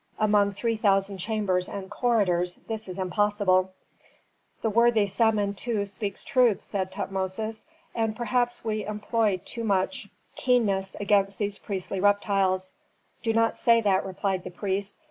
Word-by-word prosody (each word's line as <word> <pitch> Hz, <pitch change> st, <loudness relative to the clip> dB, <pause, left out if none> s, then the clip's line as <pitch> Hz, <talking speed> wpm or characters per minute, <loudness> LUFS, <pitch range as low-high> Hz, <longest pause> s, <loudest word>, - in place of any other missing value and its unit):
Among 205 Hz, -1 st, +3 dB
three 230 Hz, +3 st, -1 dB
thousand 195 Hz, -2 st, +1 dB
chambers 190 Hz, -3 st, -1 dB
and 195 Hz, -1 st, -6 dB
corridors 185 Hz, -7 st, +1 dB
this 220 Hz, -2 st, -4 dB
is 185 Hz, 0 st, -7 dB
impossible." 190 Hz, -1 st, +1 dB, 0.9 s
"The 225 Hz, -, +1 dB
worthy 230 Hz, -1 st, +4 dB
Samentu 205 Hz, +1 st, 0 dB
speaks 200 Hz, 0 st, -4 dB
truth," 250 Hz, -6 st, +3 dB
said 190 Hz, -2 st, -3 dB
Tutmosis. 195 Hz, +4 st, -4 dB, 0.3 s
"And 225 Hz, -2 st, -1 dB
perhaps 240 Hz, 0 st, -1 dB
we 215 Hz, -1 st, -1 dB
employ 210 Hz, -2 st, 0 dB
too 230 Hz, -, -5 dB
much 205 Hz, +4 st, 0 dB, 0.3 s
keenness 200 Hz, -7 st, +1 dB
against 200 Hz, -1 st, +2 dB
these 205 Hz, -1 st, -2 dB
priestly 195 Hz, -1 st, -4 dB
reptiles." 195 Hz, -2 st, +1 dB, 0.5 s
"Do 225 Hz, 0 st, 0 dB
not 225 Hz, 0 st, +2 dB
say 230 Hz, -1 st, +5 dB
that," 195 Hz, -3 st, +2 dB
replied 190 Hz, -1 st, -2 dB
the -, -, -6 dB
priest. 195 Hz, +2 st, -3 dB
205 Hz, 135 wpm, -26 LUFS, 190-225 Hz, 0.9 s, say